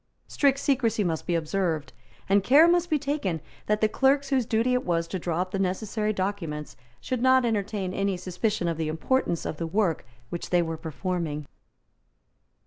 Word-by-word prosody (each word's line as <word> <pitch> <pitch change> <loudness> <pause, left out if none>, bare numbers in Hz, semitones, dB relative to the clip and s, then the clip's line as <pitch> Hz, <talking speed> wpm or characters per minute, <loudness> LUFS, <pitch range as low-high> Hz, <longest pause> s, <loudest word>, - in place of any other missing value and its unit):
Strict 275 -2 +2
secresy 245 -6 +1
must 165 -4 -2
be 175 - +1
observed; 160 -3 -1 0.3
and 200 0 +3
care 290 +9 +7
must 350 0 +2
be 310 - +3
taken 280 - -2 0.3
that 210 0 +1
the 215 - +5
clerks 275 +4 +2
whose 255 -4 +2
duty 230 +3 +2
it 250 - +1
was 165 -1 0
to 185 - -4
draw 170 0 -1
up 185 0 -3
the 195 - -2
necessary 210 +3 -1
documents 185 -7 -3 0.2
should 255 -2 -3
not 260 0 +5
entertain 205 -4 -1
any 195 -1 0
suspicion 185 +1 -1
of 165 -2 -1
the 160 -1 -1
importance 170 +4 0
of 155 - -3
the 165 - -3
work 185 -2 0 0.3
which 170 - -5
they 175 -1 +3
were 165 -1 -3
performing. 160 -2 -3
195 Hz, 180 wpm, -26 LUFS, 170-240 Hz, 0.3 s, care